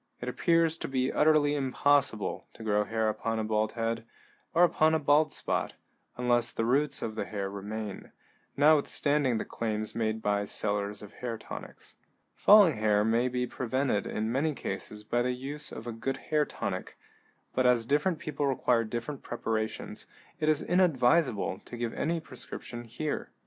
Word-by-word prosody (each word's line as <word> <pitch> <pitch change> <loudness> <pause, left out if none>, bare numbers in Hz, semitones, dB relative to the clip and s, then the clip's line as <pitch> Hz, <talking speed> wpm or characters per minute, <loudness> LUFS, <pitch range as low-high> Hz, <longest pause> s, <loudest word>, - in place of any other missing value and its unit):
It 120 - -6
appears 165 +4 +2
to - - -4
be 130 -1 0
utterly 150 -1 +4
impossible 140 -4 +1
to 115 - -11
grow 105 -1 +1
hair 110 +1 0
upon 110 +1 -1
a 110 - -1
bald 110 0 0
head, 115 -1 -2 0.5
or 170 - +4
upon 160 -2 +4
a - - +2
bald 150 +1 +3
spot, - - -1 0.4
unless 120 -1 +3
the 115 - -2
roots 140 +4 +1
of 110 - -3
the 110 - -3
hair 100 -2 -4
remain, 105 +1 -6 0.5
notwithstanding 145 -3 +3
the - - -3
claims 110 -2 -3
made 110 -1 -1
by 100 0 +1
sellers 105 0 -1
of 105 +1 -11
hair 120 -2 -4
tonics. - - -10 0.4
Falling 200 - +6
hair 105 -1 +3
may 115 +3 +2
be 125 0 -1
prevented 130 -3 -1
in 110 +1 -2
many 145 +4 0
cases 105 -4 -5
by 120 +3 0
the 125 +1 0
use 145 +4 -4
of 110 - -8
a 120 - -4
good 120 +4 -3
hair 150 -1 0
tonic, - - -5 0.6
but 130 0 +3
as 120 -2 +3
different 150 +7 +1
people 150 -2 -2
require 125 -3 +2
different 120 +5 -5
preparations, 110 -2 -3 0.3
it 155 - +1
is 155 -1 +2
inadvisable 155 - +2
to 120 - -8
give 120 -1 -3
any 165 +2 -1
prescription 125 -4 -7
here. 135 +7 -4
125 Hz, 165 wpm, -29 LUFS, 110-145 Hz, 0.6 s, Falling